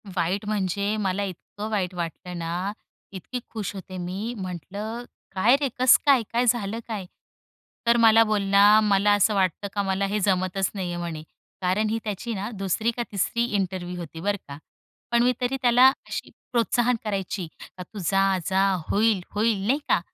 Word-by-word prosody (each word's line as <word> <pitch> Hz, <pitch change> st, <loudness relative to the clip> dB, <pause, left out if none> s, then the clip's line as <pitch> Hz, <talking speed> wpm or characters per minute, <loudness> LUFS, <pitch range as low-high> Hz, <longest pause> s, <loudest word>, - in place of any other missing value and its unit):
वाईट 185 Hz, +4 st, 0 dB
म्हणजे 200 Hz, 0 st, -1 dB
मला 200 Hz, -1 st, -1 dB
इतकं 200 Hz, +3 st, -6 dB
वाईट 190 Hz, -4 st, -1 dB
वाटलं 175 Hz, +1 st, -5 dB
ना, 175 Hz, +4 st, -2 dB, 0.4 s
इतकी 200 Hz, +6 st, -6 dB
खुश 210 Hz, -3 st, -4 dB
होते 185 Hz, -1 st, -8 dB
मी, 190 Hz, +7 st, -4 dB
म्हटलं 200 Hz, +6 st, -5 dB, 0.3 s
काय 230 Hz, +8 st, +5 dB
रे, 275 Hz, -, +1 dB
कसं 255 Hz, -1 st, +6 dB
काय, 270 Hz, -5 st, +5 dB
काय 245 Hz, +1 st, +2 dB
झालं 225 Hz, -2 st, 0 dB
काय? 210 Hz, -5 st, -4 dB, 0.8 s
तर 235 Hz, -, +5 dB
मला 225 Hz, -1 st, +7 dB
बोल 215 Hz, -2 st, 0 dB
ना, 205 Hz, +2 st, +7 dB
मला 205 Hz, 0 st, +3 dB
असं 205 Hz, +1 st, +3 dB
वाटतं 190 Hz, +1 st, 0 dB
का, 200 Hz, -, 0 dB
मला 195 Hz, +1 st, 0 dB
हे 210 Hz, +2 st, -1 dB
जमतच 185 Hz, -1 st, +1 dB
नाहीये 180 Hz, -3 st, -3 dB
म्हणे. 170 Hz, -3 st, -5 dB, 0.4 s
कारण 200 Hz, +4 st, +1 dB
ही 225 Hz, +1 st, -1 dB
त्याची 215 Hz, +2 st, -4 dB
ना 205 Hz, +2 st, -4 dB
दुसरी 195 Hz, +3 st, 0 dB
का 240 Hz, +1 st, -3 dB
तिसरी 235 Hz, +4 st, 0 dB
इंटरव्ह्यु 185 Hz, -4 st, -2 dB
होती 165 Hz, -1 st, -8 dB
बरं 205 Hz, +1 st, 0 dB
का. 140 Hz, 0 st, -8 dB, 0.5 s
पण 235 Hz, 0 st, +4 dB
मी 250 Hz, 0 st, +3 dB
तरी 255 Hz, +2 st, 0 dB
त्याला 250 Hz, +1 st, +6 dB, 0.2 s
अशी -, -, -5 dB, 0.2 s
प्रोत्साहन 240 Hz, +1 st, +2 dB
करायची, 195 Hz, -3 st, -3 dB, 0.3 s
का 180 Hz, -, -6 dB
तू 205 Hz, +3 st, -10 dB
जा, 195 Hz, +2 st, +2 dB
जा, 190 Hz, +1 st, +2 dB, 0.2 s
होईल, 210 Hz, -2 st, +2 dB
होईल 210 Hz, -2 st, +1 dB
नाही 275 Hz, +4 st, +2 dB
का? -, -, +4 dB
200 Hz, 175 wpm, -25 LUFS, 185-225 Hz, 0.8 s, मला